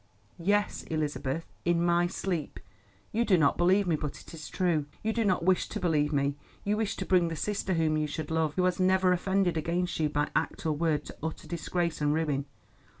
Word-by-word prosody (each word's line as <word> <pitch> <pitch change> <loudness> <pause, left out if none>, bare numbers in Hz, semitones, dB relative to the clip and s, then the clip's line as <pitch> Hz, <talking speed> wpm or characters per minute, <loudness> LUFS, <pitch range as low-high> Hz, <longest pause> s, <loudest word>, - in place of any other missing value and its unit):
"Yes, 205 +4 +1
Elizabeth, 155 -1 -2 0.2
in 170 0 +2
my 175 0 +3
sleep. 175 -4 -3 0.5
You 230 +2 +1
do 195 -6 +4
not 145 -4 +3
believe 185 +4 +3
me, 170 -3 +2
but 150 -1 -4
it - - -13
is 155 -2 -8
true. 165 -6 0 0.2
You 220 +1 0
do 230 - +1
not 185 -5 +1
wish 185 -1 +2
to - - -4
believe 150 -4 +1
me. 140 -1 +1 0.3
You 205 +1 +1
wish 215 -2 -1
to - - -4
bring 180 -2 +3
the 165 - -3
sister 195 +2 -1
whom 160 -1 +2
you 155 0 0
should 150 +1 -5
love, 160 -2 +1
who 185 - +1
has 185 0 +1
never 185 0 +4
offended 185 -1 +1
against 175 +3 -1
you 155 -1 +2
by 145 0 0
act - - -1
or 160 - +2
word, 150 -1 0
to - - -10
utter 160 +1 -5
disgrace 170 -1 -2
and 150 0 +2
ruin. 145 -4 0
170 Hz, 210 wpm, -29 LUFS, 155-185 Hz, 0.5 s, do